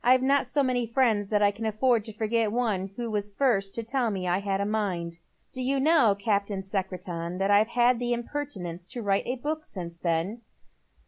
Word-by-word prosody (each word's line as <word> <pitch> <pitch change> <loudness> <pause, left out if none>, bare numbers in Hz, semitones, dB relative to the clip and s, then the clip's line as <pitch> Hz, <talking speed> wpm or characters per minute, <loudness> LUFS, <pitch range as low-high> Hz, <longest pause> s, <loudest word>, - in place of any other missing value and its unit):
I've 255 +1 +5
not 275 -1 +3
so 285 +3 +1
many 250 -2 0
friends 225 -4 +2
that 210 -1 +2
I 205 - +5
can 220 +2 -4
afford 220 +1 +2
to 220 - -5
forget 220 +1 0
the 210 - -3
one 210 -6 0
who 235 -1 -4
was 205 -1 -1
the 200 - -28
first 200 -8 +1
to 230 - -3
tell 240 +1 0
me 190 -3 -3
I 175 +2 +2
had 200 -1 -1
a 200 - 0
mind. 180 -6 -2 0.3
Do 255 - -4
you 270 +2 +1
know, 275 -8 +4
Cap 200 -1 0
tain 195 -2 -4
Secretan, 180 -3 -4
that 195 +1 +1
I've 205 +2 +5
had 240 0 +3
the 245 0 -1
impertinence 230 -9 -4
to 240 - -5
write 200 -1 +1
a 250 - -1
book 305 +5 -3
since 170 - -8
then? 170 +7 -1
215 Hz, 220 wpm, -27 LUFS, 195-245 Hz, 0.3 s, I've